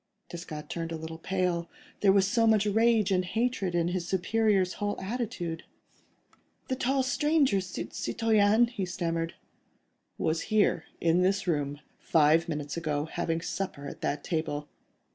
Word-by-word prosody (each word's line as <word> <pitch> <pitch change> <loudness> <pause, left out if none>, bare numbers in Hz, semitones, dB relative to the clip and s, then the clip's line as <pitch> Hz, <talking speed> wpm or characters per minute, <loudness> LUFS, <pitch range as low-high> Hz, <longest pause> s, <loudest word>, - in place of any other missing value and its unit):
Desgas 170 -3 -7
turned 165 -1 -4
a - - -2
little 160 0 -7
pale. 180 -1 -1 0.3
There 200 - +5
was 195 -1 +4
so 230 +2 +3
much 215 -2 +4
rage 220 0 +3
and 185 -1 +2
hatred 200 -2 -1
in 170 0 +2
his 175 -1 -2
superior's 195 0 +2
whole 205 0 -1
attitude. 190 -6 -4 1.1
"The 260 - +1
tall 265 +1 +1
stranger, 280 -6 +2
citoyen—" 215 +3 +1
he 220 -5 -4
stammered. 165 -2 -2 0.8
"Was 160 +4 -1
here, 210 -6 +2
in 170 +1 +3
this 195 +2 +1
room, 145 -4 -1 0.2
five 160 +2 +3
minutes 145 -3 -3
ago, 155 -3 -1
having 165 0 -2
supper 175 -6 -4
at - - -9
that 145 0 -2
table. 150 -3 -2
180 Hz, 145 wpm, -29 LUFS, 165-210 Hz, 1.1 s, There